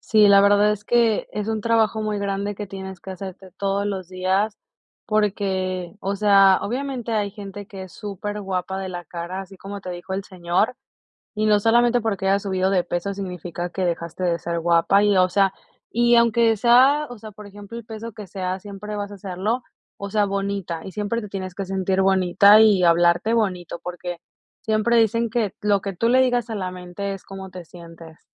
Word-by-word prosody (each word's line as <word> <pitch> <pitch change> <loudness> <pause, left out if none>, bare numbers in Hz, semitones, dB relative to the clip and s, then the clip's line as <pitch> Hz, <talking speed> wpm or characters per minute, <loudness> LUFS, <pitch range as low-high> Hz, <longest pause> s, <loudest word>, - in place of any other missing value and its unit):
Sí, 215 -1 +4
la 200 0 +7
verdad 205 +1 +4
es 210 0 -6
que, 230 -2 +2
es 210 +1 -3
un 220 -1 -1
trabajo 225 0 +2
muy 215 -1 -2
grande 200 +1 -2
que 205 +1 -6
tienes 190 -1 -8
que 190 - -9
hacerte 190 0 -8
todos 200 0 0
los 190 -3 -4
días, 190 +3 0 0.5
porque, 190 -4 -1
o 200 +1 -2
sea, 195 -2 +5
obviamente 250 0 -3
hay 205 -2 0
gente 200 -1 -9
que 195 -1 -9
es 185 - -14
superguapa 195 -2 -4
de 190 -1 -4
la 175 -1 -6
cara, 170 +3 -6
así 195 0 -13
como 200 +1 -7
te 185 - -6
dijo 180 +2 -7
el 195 0 -3
señor, 180 +5 -1 0.6
y 215 0 0
no 210 -1 +4
solamente 240 +3 +3
porque 200 -3 -1
hayas 200 +1 +2
subido 190 -1 0
de 185 -2 +2
peso 175 +3 -3
significa 180 -2 -5
que 185 +1 -2
dejaste 170 0 -3
de 170 -1 +1
ser 170 +1 -3
guapa 170 +4 +3
y, 205 -1 +3
o 185 - +5
sea, 195 +1 +2 0.4
y 240 +1 +4
aunque 235 -1 +4
sea, 260 +7 +5
o 245 - -9
sea, 215 0 -10
por 210 +1 -12
ejemplo, 205 +3 -10
el 235 - -9
peso 225 0 -8
que 210 -1 -9
sea, 185 0 -3
siempre 205 +1 -7
vas 205 0 -4
a 200 - -9
serlo, 195 +6 -2 0.4
o 200 - -6
sea, 210 0 +2
bonita, 195 -4 -3
y 190 - -7
siempre 210 +3 -2
te 210 - -8
tienes 185 -2 -5
que 195 - -4
sentir 190 0 0
bonita 190 +2 +5
y 205 -4 +5
hablarte 175 +5 +3
bonito, 185 -7 -1
porque 175 0 -5 0.4
siempre 220 +2 +2
dicen 230 +1 +2
que: 220 -3 -1
"Lo 205 -1 +2
que 195 -1 -4
tú 230 +6 0
le 255 +2 +5
digas 245 -3 +1
a 220 - -3
la 185 -2 -3
mente 180 +2 -5
es 195 - -9
cómo 190 -1 -9
te 180 -1 -9
sientes". 165 -1 -13
200 Hz, 205 wpm, -22 LUFS, 185-215 Hz, 0.6 s, la